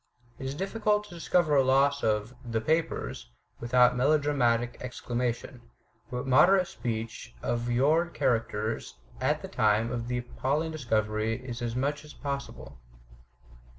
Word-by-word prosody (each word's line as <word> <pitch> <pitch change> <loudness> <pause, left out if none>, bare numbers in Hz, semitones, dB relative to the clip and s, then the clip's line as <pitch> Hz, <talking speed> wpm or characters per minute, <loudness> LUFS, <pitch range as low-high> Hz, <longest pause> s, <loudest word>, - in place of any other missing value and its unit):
" 120 -1 -31
It 135 - -4
is 135 - -4
difficult 210 +3 0
to 210 -4 -13
discover 170 -2 +2
a 135 - +5
loss 140 +2 +3
of 105 +2 0
"the 115 -2 -1
papers" 155 - -1 0.3
without 125 +1 +4
melodramatic 125 -4 +2
exclamation; 125 0 -3 0.5
but 125 +1 -4
moderate 175 +9 +6
the - - -12
speech 115 0 -5
of 120 0 -1
your 150 +8 +3
characters 115 - -1 0.3
at - - +1
the - - -4
time 110 -1 +2
of 120 -1 -3
the 125 0 -1
appalling 140 +6 -2
discovery 115 -3 -1
as 120 -1 -4
much 145 +4 -1
as 150 - -13
possible. 140 - -6
125 Hz, 140 wpm, -28 LUFS, 115-145 Hz, 0.5 s, moderate